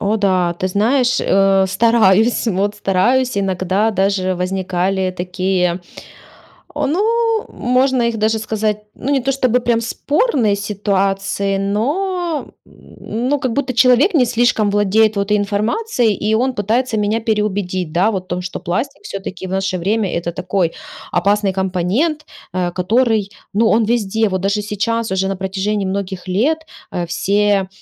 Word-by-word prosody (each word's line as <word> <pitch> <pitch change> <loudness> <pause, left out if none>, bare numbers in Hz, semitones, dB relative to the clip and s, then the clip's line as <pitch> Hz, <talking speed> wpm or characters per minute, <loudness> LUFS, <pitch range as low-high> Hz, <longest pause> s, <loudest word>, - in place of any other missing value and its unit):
О 210 +2 +1
да, 185 -4 +1
ты 185 - -2
знаешь, 245 +6 +2
э, 195 0 +3
стараюсь, 225 +1 +3
вот 200 +1 0
стараюсь. 230 +5 +1
Иногда 190 +2 0
даже 190 -2 0
возникали 185 +1 -1
такие, 180 0 -1 0.9
о, - - -1
ну 450 - +1
можно 255 +1 +1
их 235 -1 0
даже 220 +1 +1
сказать, 215 -1 -2
ну 275 - -4
не 275 -2 +2
то 270 +2 0
чтобы 255 -2 +1
прям 235 -1 +1
спорные 260 - +1
ситуации, 195 -1 -1
но, 310 - -1 0.2
м, - - -21 0.6
ну 290 +1 +2
как 255 -4 -1
будто 270 -2 -1
человек 255 - +4
не 265 -6 +5
слишком 235 -3 +2
владеет 205 +1 +2
вот 200 +1 0
информацией 215 - 0
и 210 +2 -1
он 255 +4 +1
пытается 225 +4 0
меня 210 +2 0
переубедить, 200 -6 -1
да 185 +6 +2
вот 190 -3 -3
в - - -30
том, 180 0 -3
что 180 - -6
пластик 180 - -3
все-таки 190 -1 -6
в - - -8
наше 190 0 -1
время- 200 +2 0
это 170 0 -2
такой 180 -1 -1 0.4
опасный 200 +1 +1
компонент, 190 - -1 0.3
э, 180 -1 -1
который, 215 +2 +1 0.2
ну 220 +2 +3
он 225 +1 +3
везде. 220 -1 +1
Вот 185 -1 -2
даже 200 +2 0
сейчас 220 +2 -2
уже 190 0 0
на 195 - -2
протяжении 195 +1 -2
многих 190 -1 -4
лет, 245 +13 +1 0.3
э, 175 -1 -3
все, 200 +2 +1
205 Hz, 150 wpm, -18 LUFS, 190-235 Hz, 0.9 s, не